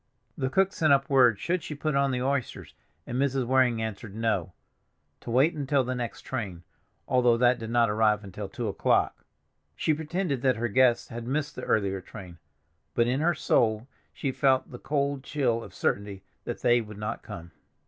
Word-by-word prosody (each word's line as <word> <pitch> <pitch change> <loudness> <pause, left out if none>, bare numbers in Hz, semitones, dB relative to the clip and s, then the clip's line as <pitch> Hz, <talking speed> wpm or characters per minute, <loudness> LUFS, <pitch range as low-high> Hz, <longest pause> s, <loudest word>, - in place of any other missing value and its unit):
The 130 -2 -1
cook 195 +6 +2
sent 155 -2 +2
up 140 0 +3
word 125 -6 +5
should 180 - -1
she 150 - -6
put 155 +1 -2
on 140 0 +3
the 125 -1 -1
oysters, 135 -2 -2 0.3
and 125 - -3
Mrs. 135 -2 +1
Waring 125 -3 +2
answered 105 -1 -6
no, 110 -6 -1 0.7
to - - -10
wait 135 +8 +3
until 140 -2 +1
the 130 +1 -2
next 120 -2 -4
train, 100 -10 -5 0.4
although 125 -2 +3
that 125 +1 +3
did 115 -1 -6
not 120 0 +3
arrive 105 0 +2
until 100 +1 -7
two 120 -2 -4
o'clock. 100 - +1 0.5
She 155 - +1
pretended 160 -2 -2
that 130 -1 +3
her 115 +2 -2
guests 125 +1 +3
had 115 0 -7
missed 150 +2 -2
the - - -6
earlier 95 -3 0
train, 90 -3 -11 0.6
but 120 - +3
in 125 +3 0
her 170 +2 +2
soul 110 -3 +1 0.2
she 135 - -3
felt 130 0 +2
the 125 - -8
cold 140 -1 -1
chill 125 -6 0
of - - -11
certainty 100 -1 -2 0.2
that - - -5
they 120 0 +4
would 105 -2 -10
not 105 +1 -4
come. 85 0 -9
125 Hz, 190 wpm, -27 LUFS, 110-140 Hz, 0.7 s, word